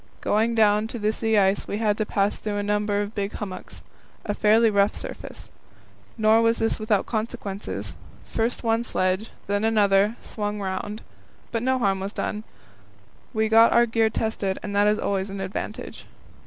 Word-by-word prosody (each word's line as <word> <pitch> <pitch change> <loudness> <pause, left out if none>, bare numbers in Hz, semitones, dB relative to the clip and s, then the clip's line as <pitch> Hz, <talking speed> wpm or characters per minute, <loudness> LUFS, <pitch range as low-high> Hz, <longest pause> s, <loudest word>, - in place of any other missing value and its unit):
Going 225 +2 +1
down 210 -1 +3
to 235 - -6
the 215 0 0
sea 220 -1 +1
ice 195 0 +2
we 205 - -3
had 210 -2 +1
to 215 - 0
pass 200 0 +1
through 210 -1 -4
a 205 - -1
number 205 0 0
of 205 +1 -7
big 200 -1 -3
hummocks 195 -3 -7 0.4
a 205 - -1
fairly 220 +2 +4
rough 200 0 +2
surface. - - -8 0.7
Nor 220 +1 +4
was 230 0 +3
this 225 0 0
without 215 -2 +1
consequences; 215 -3 -4 0.3
first 230 +3 -2
one 225 0 +1
sledge, 185 0 -1 0.2
then 205 +1 -1
another, 210 -1 +3
swung 210 -2 -4
round. 200 +2 -4 0.5
But 230 - -1
no 260 +2 +1
harm 195 -5 +1
was 195 +2 -4
done; 210 0 -3 0.9
we 220 -2 +1
got 225 +1 +6
our 235 0 +5
gear 225 -1 +2
tested, 215 -3 -2
and 200 -1 -4
that 205 +1 +4
is 210 0 +3
always 195 -1 -1
an 195 0 -6
advantage. 190 0 -6
210 Hz, 175 wpm, -24 LUFS, 200-225 Hz, 0.9 s, got